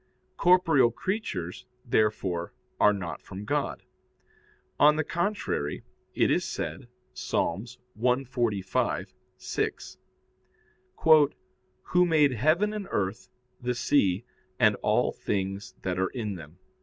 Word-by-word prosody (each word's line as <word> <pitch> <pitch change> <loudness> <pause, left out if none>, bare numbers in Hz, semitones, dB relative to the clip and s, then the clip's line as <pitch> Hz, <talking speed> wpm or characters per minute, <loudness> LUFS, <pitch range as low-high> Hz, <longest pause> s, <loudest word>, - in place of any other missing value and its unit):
Corporeal 165 -8 +5
creatures, 120 - -4 0.2
therefore, 100 -7 0 0.2
are 105 - +6
not 95 -4 -5
from 100 +1 -8
God. - - -2 1.0
On 150 +1 +7
the 155 - 0
contrary, 170 - -2 0.3
It - - +3
is - - +2
said - - -5 0.3
(Ps. - - -7 0.6
145:6): 120 -4 -2 1.9
"Who 180 0 +3
made 150 -4 +4
heaven 155 - +2
and 210 -2 -5
earth, 95 -1 -2 0.3
the 125 0 -1
sea, 115 -5 +2 0.3
and - - +5
all - - +1
things 95 0 -3
that 90 -1 -1
are 95 - +1
in 110 -5 -4
them." 80 -2 -11
115 Hz, 105 wpm, -28 LUFS, 95-150 Hz, 1.9 s, On